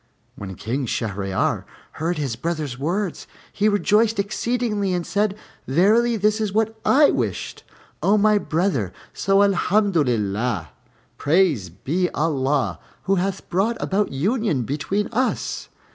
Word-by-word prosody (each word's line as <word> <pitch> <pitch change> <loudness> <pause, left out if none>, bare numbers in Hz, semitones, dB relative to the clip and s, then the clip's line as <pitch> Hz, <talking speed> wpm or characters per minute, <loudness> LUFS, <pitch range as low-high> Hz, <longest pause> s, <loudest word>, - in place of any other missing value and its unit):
When 95 -2 -7
King 125 +7 -3
Shahryar 100 -4 -1 0.3
heard 170 +3 -2
his 135 -6 -2
brother's 150 -2 -3
words, 175 +5 -2 0.3
he 210 +1 +2
rejoiced 210 +2 +2
exceedingly 210 -1 -1
and 175 -1 -2
said, 205 0 0 0.3
"Verily, 215 - +3
this 210 +2 +1
is 210 -2 -1
what 220 +2 0
I 290 +2 +5
wished, - - -3 0.4
O 205 +2 +4
my 210 0 +4
brother. 155 - -1 0.2
So 195 +1 +3
Alhamdolillah 125 - +1 0.5
Praised 145 - +1
be 180 +5 +1
Allah! 145 -3 0 0.2
who 195 +1 +1
hath 190 +1 -2
brought 205 +6 0
about 200 +1 0
union 185 - 0
between 155 - -1
us." 250 +3 -1
185 Hz, 125 wpm, -22 LUFS, 135-210 Hz, 0.5 s, I